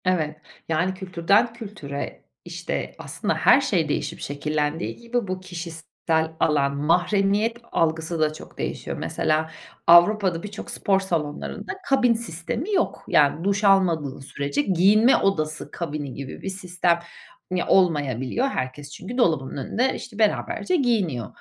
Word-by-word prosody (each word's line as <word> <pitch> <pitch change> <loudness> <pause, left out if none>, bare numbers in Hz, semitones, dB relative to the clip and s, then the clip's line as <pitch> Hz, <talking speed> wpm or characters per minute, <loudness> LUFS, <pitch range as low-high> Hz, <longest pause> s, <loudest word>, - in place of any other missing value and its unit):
Evet, 160 -5 +1 0.3
yani 175 +4 +1
kültürden 190 +4 +1
kültüre 195 - -7 0.2
işte - - -4
aslında - - -2
her - - +5
şey - - 0
değişip - - -2
şekillendiği 150 +2 -2
gibi 235 -2 -3
bu 185 0 -3
kişisel 165 -2 -3
alan 140 -2 +2
mahremiyet 195 +8 +2
algısı 165 0 0
da 155 -1 +2
çok 155 - -12
değişiyor. - - -4
Mesela 155 +1 0 0.4
Avrupa'da 175 0 +5
birçok 210 0 -7
spor 195 -1 +1
salonlarında 165 -6 -3 0.2
kabin 260 -3 +4
sistemi 230 - -4
yok. 365 - 0
Yani 150 +2 +3
duş 200 +2 0
almadığı 170 -9 +3
sürece 140 +1 -2
giyinme 200 - +5
odası 155 -6 -1
kabini 150 -5 -4
gibi 130 +1 -7
bir - - -4
sistem 180 -2 0 0.5
mi 185 -1 +1
olmayabiliyor. 150 - +2
Herkes 140 - -4
çünkü 215 +11 -7
dolabının 155 - +1
önünde 255 +4 +1
işte 225 -3 -9
beraberce 220 - +1
giyiniyor. 200 - +1
175 Hz, 130 wpm, -24 LUFS, 155-205 Hz, 0.5 s, her